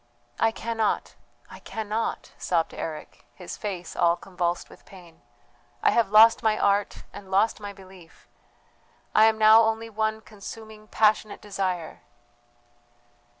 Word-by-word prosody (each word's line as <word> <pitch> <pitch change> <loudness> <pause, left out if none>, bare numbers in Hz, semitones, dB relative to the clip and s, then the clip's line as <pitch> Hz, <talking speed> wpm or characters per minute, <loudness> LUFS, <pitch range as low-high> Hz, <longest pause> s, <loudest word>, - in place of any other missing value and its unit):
"I 225 - +4
cannot, 225 -1 -2 0.3
I - - -12
cannot," 220 +1 -4
sobbed 165 -2 -1
Eric, 155 -2 -7
his 180 - -8
face 185 -5 -6
all 170 0 +3
convulsed 175 -1 -3
with - - -17
pain; 175 -4 -16 0.6
"I - - +5
have 230 -4 +2
lost 220 +2 +7
my 215 -1 +1
art 200 0 0
and 200 -2 -11
lost 200 +4 +2
my 205 -1 -7
belief. 190 -3 -17 0.9
I 215 - +6
am 220 0 +3
now 220 +1 +7
only 225 0 -1
one 220 0 -1
consuming 215 +1 -11
passionate 215 -1 +1
desire." 185 -5 -4
210 Hz, 130 wpm, -25 LUFS, 185-220 Hz, 0.9 s, lost